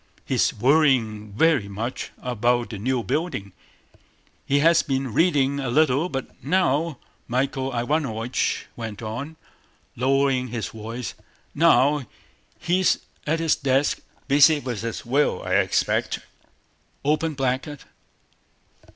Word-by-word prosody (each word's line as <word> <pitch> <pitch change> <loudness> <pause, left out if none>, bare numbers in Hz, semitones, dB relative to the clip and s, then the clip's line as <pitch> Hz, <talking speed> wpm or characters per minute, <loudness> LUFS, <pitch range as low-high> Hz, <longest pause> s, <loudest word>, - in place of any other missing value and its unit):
"He's - - +2
worrying 120 -6 +2
very 140 -3 +3
much 110 +5 -4
about 120 0 0
the 105 - -6
new 125 +2 0
building. 135 - -3 0.9
He 140 - +3
has 165 +3 +5
been 135 -4 -2
reading 140 -4 +2
a 135 -2 -2
little, 150 +4 +2
but 135 -4 -6
now"—Michael 135 -5 -1
Ivánovich 120 -2 -1
went 110 -2 -6
on, 125 +9 -5 0.6
lowering 135 0 +1
his 115 -2 -4
voice—"now 130 +5 0 0.5
he's 180 +2 +2 0.3
at 160 +2 +1
his 165 -2 +2
desk, 135 +1 +1 0.3
busy 145 +2 +6
with 120 -7 -4
his 115 0 -5
will, 140 +5 +1
I - - -2
expect." - - +1
135 Hz, 100 wpm, -24 LUFS, 120-150 Hz, 0.9 s, busy